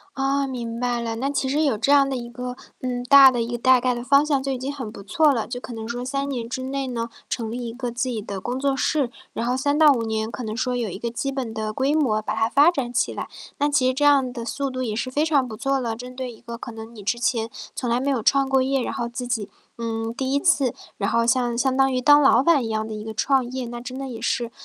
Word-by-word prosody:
哦， 275 +1 +1
明 235 -2 -5
白 245 -1 0
了。 230 -1 -3
那 270 +4 -1
其 275 -1 -1
实 290 +4 +1
有 275 -8 +1
这 250 +6 +2
样 280 -1 +5
的 265 - -1
一 240 -1 -6
个， 250 +1 -6 0.2
嗯， 245 -1 -3
大 275 +1 +9
的 245 -2 -2
一 230 +1 -2
个 240 - -2
大 255 +1 +5
概 250 0 +1
的 240 - -5
方 280 +4 +4
向 280 -3 +1
就 275 - -2
已 260 - -2
经 265 +3 -4
很 260 -6 -6
不 215 - -11
错 295 +9 +3
了， 230 -5 -1
就 245 0 -5
可 250 - -8
能 225 -1 -6
说 245 +1 -4
3 275 +2 -2
年 240 -4 -4
之 255 +2 -4
内 270 0 -3
呢， 235 -2 -3 0.2
成 225 -3 -3
立 240 +1 -4
一 - - -5
个 245 0 -4
自 255 +2 -1
己 235 -3 -2
的 200 -2 -6
工 245 +6 -3
作 275 0 +1
室。 275 -2 +1 0.2
然 230 - -3
后 250 +1 +1
3 285 +2 +1
到 310 -2 +7
5 240 -4 -1
年 220 -1 -2
可 250 - -6
能 220 -1 -4
说 250 0 -1
有 235 -3 -1
一 185 - -6
个 235 - -3
基 255 +4 -2
本 260 -5 -4
的 215 -1 -3
规 270 +6 +1
模， 245 -9 +2
把 - - -3
它 225 +1 +1
发 285 +6 +5
展 255 -7 -3
起 - - +1
来， - - -5 0.3
那 290 - +2
其 285 -3 +2
实 255 - +2
这 290 +3 0
样 275 -3 +4
的 235 -2 -6
速 275 +5 -2
度 255 0 -3
也 220 -4 -2
是 235 - -2
非 290 +4 +1
常 290 -5 +2
不 220 -3 -7
错 275 +3 0
了。 235 -3 -2
针 250 +2 -9
对 255 -2 -4
一 225 - -16
个 235 -1 -8
可 235 - -7
能 225 +1 -9
你 210 - -10
之 215 +5 0
前 230 -2 0 0.3
从 250 - -2
来 235 +1 +1
没 280 +2 0
有 260 -4 +1
创 275 +4 +3
过 265 0 +3
业， 265 0 +1
然 - - -3
后 235 - -3
自 240 +1 -5
己， 225 -4 -2 0.3
嗯， 225 -1 -3
第 260 +2 -3
1 280 - +2
次， 290 -7 +2 0.2
然 200 - -1
后 230 0 +2
像 240 0 +1
相 260 +1 +1
当 270 0 +3
于 255 - 0
当 290 +3 +7
老 270 -3 +5
板 290 -4 +4
一 - - -3
样 220 0 -1
的 - - -6
一 215 0 -6
个 220 0 -6
创 265 +2 +2
业。 255 0 -4
那 240 0 -6
真 250 +1 -7
的 270 0 -5
也 230 -3 -7
是， 235 0 -1
250 Hz, 310 characters per minute, -23 LUFS, 230-270 Hz, 0.3 s, 大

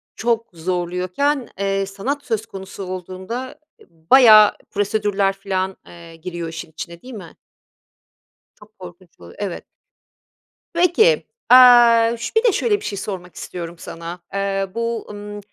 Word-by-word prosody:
çok 230 0 -1
zorluyorken, 180 - -2
eee, 195 0 0
sanat 255 +9 -4
söz 220 0 -2
konusu 195 -1 -9
olduğunda, 185 +7 -6 0.2
eee, - - -19 0.3
bayağı 220 -5 +8
prosedürler 205 -1 0
filan, 190 -1 -3
eee, 170 -1 -13
giriyor 170 0 -6
işin 165 -1 -8
içine 170 +2 -9
değil 255 - -11
mi? 190 -7 -10 1.2
Çok 210 0 -20
korkunç 175 -1 -14
oluyor, 85 0 -14
evet. 200 -4 -5 1.1
Peki, 360 +8 +3 0.2
aaa, 240 -2 +7
şö 445 - +1
şöyle 415 0 +1
bir - - -10
şey 200 - -4
sormak 180 -4 -6
istiyorum 170 -1 -7
sana. 170 +1 -8
Eee, 195 0 -1
bu, 230 -1 -3
ımm, 205 0 -8
200 Hz, 130 wpm, -20 LUFS, 180-230 Hz, 1.2 s, bayağı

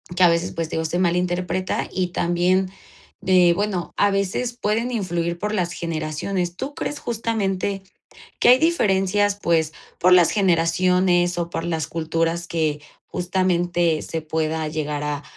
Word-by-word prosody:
que 185 - -1
a 180 - +8
veces, 170 +1 0
pues, 165 -1 -4
te - - -4
digo, 160 0 -1
se 175 +3 -1
malinterpreta 180 +1 0
y 180 -1 -1
también 180 +2 +1 0.5
de, 180 -2 +5
bueno, 195 -1 -2
a 205 0 +3
veces 200 +5 -1
pueden 230 +1 -1
influir 175 -6 -2
por 210 +3 -3
las 180 -4 -1
generaciones. 170 +2 -3
¿Tú 275 +9 -5
crees, 290 - -4
justamente 200 -4 -2 0.6
que - - +5
hay 250 - +7
diferencias, 205 - +2
pues, 160 -3 +1 0.3
por 180 +1 +4
las 175 -2 +7
generaciones 180 -1 +2
o 170 -1 -2
por 165 - -4
las 160 -3 -2
culturas 165 +1 -1
que 155 -3 -1 0.2
justamente 175 -2 0
se 165 - -4
pueda 155 0 -2
llegar 150 -1 -3
a 145 -1 -3
175 Hz, 150 wpm, -22 LUFS, 165-190 Hz, 0.6 s, a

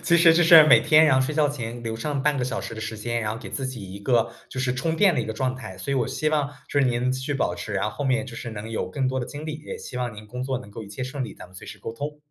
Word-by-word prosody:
其 170 - +3
实 170 -1 +7
就 175 +1 +4
是 165 -1 +10
每 155 - +7
天 155 0 +6
然 130 -4 +5
后 - - +2
睡 150 +2 -3
觉 150 -2 +3
前 120 -4 -5
留 115 -1 -3
上 140 +3 -2
半 150 -1 +2
个 125 - 0
小 130 - -2
时 - - -7
的 110 - -7
时 110 0 -4
间， 120 +2 -2
然 105 0 -1
后 - - -5
给 - - -9
自 135 - -3
己 110 -8 -7
一 100 - -7
个 115 +2 +2 0.2
就 130 - -5
是 125 -1 +1
充 160 +5 -1
电 195 -1 +5
的 130 - 0
一 - - -2
个 110 - -3
状 130 +3 -1
态。 95 -8 -8
所 95 +8 -5
以 140 - +2
我 125 - +1
希 155 - -1
望 150 -2 +1 0.2
就 145 - 0
是 135 - +4
您 125 +1 +1
继 130 0 -2
续 145 +2 -2
保 120 - 0
持， 100 +4 -6
然 100 - 0
后 105 - -1
后 145 - -5
面 135 0 +1
就 120 -3 -9
是 120 - -6
能 110 0 -7
有 110 - -2
更 135 -2 -1
多 130 0 -1
的 120 - -3
精 150 +1 -8
力， 155 -1 -5
也 - - -5
希 125 - -8
望 125 -3 -2
您 105 0 -10
工 125 +4 -7
作 130 0 -1
能 120 -5 -9
够 110 +1 -8
一 - - -12
切 105 +6 -6
顺 130 +1 -3
利， - - -8
咱 - - -11
们 90 - -21
随 90 - -10
时 - - -9
沟 115 - -5
通。 145 +5 -5
130 Hz, 385 characters per minute, -25 LUFS, 115-145 Hz, 0.2 s, 是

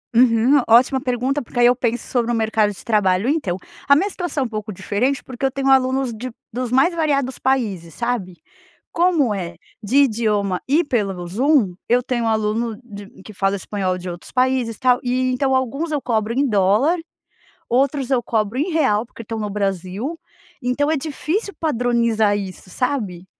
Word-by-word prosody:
Uhum, 245 +3 +5
ótima 255 +3 +5
pergunta 255 +3 -1
porque 245 0 -6
aí 240 - +6
eu 245 +1 +5
penso 240 -1 -2
sobre 240 -2 0
o - - +1
mercado 220 -1 +1
de 195 - -11
trabalho 205 -1 +2
então, 270 - 0 0.3
a - - +9
minha 390 +7 +1
situação 345 -8 -3
é - - -2
um - - -4
pouco 215 -1 -5
diferente 245 +8 -1
porque 260 +1 -4
eu 265 - +1
tenho 275 0 -2
alunos 260 -1 +3
de 245 +3 -6 0.2
dos 250 -1 -3
mais 305 +7 +3
variados 280 -5 0
países, 205 - -1
sabe. 235 -7 -3 0.6
Como 335 -9 +2
é 175 -4 -4 0.3
de 225 +7 -1
idioma 210 -5 0
e 300 +6 +3
pelo 195 - -2
Zoom, 235 - +2
eu 245 +1 +3
tenho 240 -2 -1
aluno 220 +1 0
de 205 -4 -10 0.2
que 215 - -11
fala 195 +1 0
espanhol, 190 -2 -2
de 180 0 -6
outros 175 0 -10
países, 255 -3 +1
tal 250 -1 +3
e 255 +1 +1
então 265 +1 +1
alguns 275 +6 -1
eu 290 - -1
cobro 225 -2 0
em 280 +2 +2
dólar, 215 - +3 0.7
outros 270 +1 +1
eu 250 -2 +3
cobro 225 +2 -1
em 320 - 0
real 265 -10 +2
porque 230 - -11
estão 225 +1 -5
no 210 -1 -3
Brasil, 200 - -3 0.4
então 270 +5 0
é 320 - +2
difícil 325 +8 -3
padronizar 235 -7 +1
isso, 190 -1 -7
sabe. 200 -7 -2
240 Hz, 180 wpm, -20 LUFS, 210-270 Hz, 0.7 s, a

